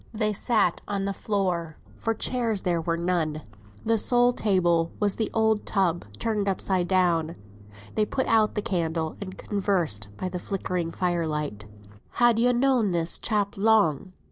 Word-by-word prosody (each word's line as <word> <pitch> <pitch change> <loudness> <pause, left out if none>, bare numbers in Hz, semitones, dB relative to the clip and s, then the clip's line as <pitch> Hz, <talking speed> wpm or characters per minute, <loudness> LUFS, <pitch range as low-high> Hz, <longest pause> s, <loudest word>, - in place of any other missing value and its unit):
They 215 -1 +1
sat 205 -4 +1
on 200 -1 -2
the 200 - -1
floor, 180 -6 -2 0.2
for 225 0 -2
chairs 230 -3 -1
there 170 -2 0
were 165 +1 -1
none; 165 -3 -1 0.4
the 225 0 +3
sole 245 +2 +4
table 175 -7 +1
was 205 -2 +1
an 220 - +1
old 220 -1 +2
tub 180 - 0
turned 210 - -1
upside 185 -2 0
down. 175 -3 +1 0.6
They 215 - +2
put 265 - -1
out 220 -1 +2
the 210 - -1
candle 165 -6 -1
and 185 -2 -6
conversed 175 - -1
by 185 - -3
the 180 0 -4
flickering 180 -3 -3
fire 175 -2 -1
light. 150 -9 -4 0.5
"Han 240 -2 +4
yo 245 +2 +4
known 245 -5 +2
this 170 -1 -1
chap 205 -3 -1
long?" 195 -5 +2
190 Hz, 160 wpm, -26 LUFS, 170-215 Hz, 0.6 s, sole